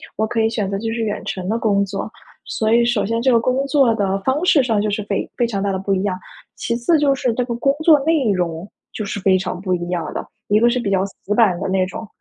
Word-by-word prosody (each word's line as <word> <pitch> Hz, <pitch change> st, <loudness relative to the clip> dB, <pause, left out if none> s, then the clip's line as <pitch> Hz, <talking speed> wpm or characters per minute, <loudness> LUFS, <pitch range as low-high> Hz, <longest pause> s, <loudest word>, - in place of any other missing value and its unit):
我 220 Hz, -, 0 dB
可 225 Hz, +1 st, -2 dB
以 220 Hz, -, +2 dB
选 210 Hz, -4 st, -2 dB
择 195 Hz, -, -1 dB
就 225 Hz, +1 st, -3 dB
是 230 Hz, -, -3 dB
远 210 Hz, -1 st, -3 dB
程 185 Hz, -1 st, -4 dB
的 225 Hz, -, 0 dB
工 200 Hz, -3 st, +2 dB
作。 195 Hz, +2 st, -5 dB, 0.4 s
所 220 Hz, 0 st, -1 dB
以 235 Hz, +1 st, +4 dB
首 240 Hz, -3 st, +1 dB
先 230 Hz, +3 st, -1 dB
这 260 Hz, -, +2 dB
个 235 Hz, -, +5 dB
工 255 Hz, +3 st, 0 dB
作 270 Hz, -4 st, +3 dB
的 195 Hz, -3 st, 0 dB
方 270 Hz, -, 0 dB
式 295 Hz, -6 st, +5 dB
上 225 Hz, -4 st, +1 dB
就 210 Hz, -, 0 dB
是 210 Hz, +1 st, -2 dB
非 200 Hz, -1 st, -3 dB
非 240 Hz, -, +1 dB
常 200 Hz, -4 st, -3 dB
大 200 Hz, -, 0 dB
的 -, -, -1 dB
不 195 Hz, +1 st, -1 dB
一 190 Hz, 0 st, 0 dB
样。 190 Hz, -3 st, -1 dB, 0.4 s
其 235 Hz, -, -3 dB
次 245 Hz, +8 st, +2 dB
就 290 Hz, -2 st, +3 dB
是 255 Hz, -3 st, -1 dB
这 250 Hz, -, 0 dB
个 240 Hz, -1 st, -4 dB
工 275 Hz, +4 st, +1 dB
作 310 Hz, -3 st, +6 dB
内 305 Hz, -9 st, +2 dB
容， 175 Hz, 0 st, -2 dB, 0.2 s
就 215 Hz, -, -4 dB
是 200 Hz, 0 st, -4 dB
非 190 Hz, -1 st, +3 dB
常 180 Hz, -1 st, -4 dB
不 185 Hz, -1 st, -2 dB
一 175 Hz, 0 st, -5 dB
样 170 Hz, -4 st, -3 dB
的。 -, -, -4 dB, 0.2 s
一 205 Hz, -, +3 dB
个 235 Hz, +2 st, +4 dB
是 250 Hz, +1 st, 0 dB
比 215 Hz, -, -2 dB
较 190 Hz, -1 st, +1 dB
死 200 Hz, +1 st, -5 dB
板 200 Hz, -7 st, +3 dB
的 195 Hz, -, -3 dB
那 190 Hz, -1 st, +1 dB
种， 210 Hz, +4 st, -7 dB
215 Hz, 305 characters per minute, -20 LUFS, 195-240 Hz, 0.4 s, 作